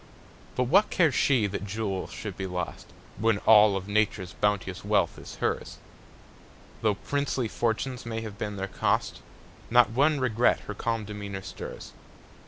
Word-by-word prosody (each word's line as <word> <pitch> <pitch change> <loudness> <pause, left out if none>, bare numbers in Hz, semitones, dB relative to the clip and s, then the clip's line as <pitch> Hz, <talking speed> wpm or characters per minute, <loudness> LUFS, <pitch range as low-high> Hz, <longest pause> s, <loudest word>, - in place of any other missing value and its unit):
But 125 - +2
what 190 - +4
cares 160 -6 +3
she 125 -6 +3
that 100 0 -3
jewels 100 -2 -3
should - - -6
be 95 - -4
lost, 90 -1 -5 0.3
When 110 -1 +3
all 105 -2 +7
of 95 0 -6
Nature's 100 -4 0
bounteous 105 -2 -1
wealth - - +1
is - - -10
hers? - - -2 1.0
Though 110 -2 +2
princely 140 0 -1
fortunes 120 +3 -2
may 115 -1 -4
have 105 -2 -8
been 105 -1 -3
their 95 0 -3
cost, - - -1 0.5
Not 120 -1 +5
one 145 +5 +3
regret 120 -2 +2
her - - -6
calm 115 -2 -2
demeanor 100 -2 -6
stirs. - - -8
110 Hz, 155 wpm, -27 LUFS, 100-125 Hz, 1.0 s, all